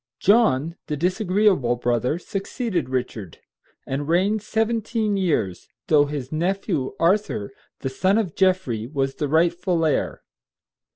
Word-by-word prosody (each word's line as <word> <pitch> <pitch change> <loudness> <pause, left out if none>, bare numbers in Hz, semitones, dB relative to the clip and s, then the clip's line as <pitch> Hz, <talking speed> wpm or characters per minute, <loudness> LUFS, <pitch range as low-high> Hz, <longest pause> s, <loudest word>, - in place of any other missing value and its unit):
John, 170 - +3
the 150 - -2
disagreeable 185 - +2
brother, 120 +4 0
succeeded 195 - -3
Richard, 120 -8 -4 0.5
and 140 +2 -3
reigned 195 +6 +2
seventeen 220 0 0
years, 150 - -1 0.2
though 145 -2 +5
his 140 -3 -5
nephew, 170 -3 -1
Arthur, 170 - +1 0.3
the 135 - -2
son 190 +10 +1
of 200 -8 -1
Geoffrey, 185 - +1
was 135 -1 -1
the 145 - -2
rightful 170 +2 +2
heir. 155 - -1
170 Hz, 120 wpm, -23 LUFS, 135-195 Hz, 0.5 s, though